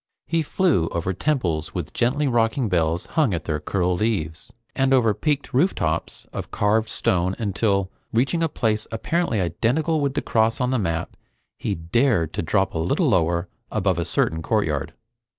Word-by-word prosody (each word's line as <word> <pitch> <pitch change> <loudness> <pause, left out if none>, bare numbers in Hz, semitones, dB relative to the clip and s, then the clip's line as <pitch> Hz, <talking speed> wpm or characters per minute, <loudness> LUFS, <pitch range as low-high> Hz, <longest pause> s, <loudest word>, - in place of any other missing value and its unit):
He 165 0 +1
flew 155 - +1
over 85 +3 -2
temples 90 - -1
with - - -4
gently 135 +5 +1
rocking 115 -1 +1
bells 85 -1 +1
hung 145 - +1
at 85 - -4
their 75 -2 -2
curled 90 +3 -1
eaves, 80 -8 -2 0.2
and 135 0 +3
over 115 -4 +3
peaked 145 +4 -1
rooftops 125 - 0
of - - -5
carved 110 +2 +1
stone 90 +1 +1
until, 100 -2 0 0.2
reaching 135 +9 +1
a 165 - +2
place 110 -6 -1
apparently 125 +2 0
identical 145 - 0
with 140 -1 -1
the - - -1
cross 110 0 +2
on 125 0 +1
the 130 - +1
map, 85 -4 -2 0.4
he - - -2
dared 85 - +1
to - - -1
drop 95 +4 +1
a 80 - -2
little 80 +2 +1
lower 85 -1 +1 0.2
above 95 -5 +1
a 85 - -1
certain 80 +1 0
courtyard. 80 -6 -1
105 Hz, 170 wpm, -23 LUFS, 85-130 Hz, 0.4 s, and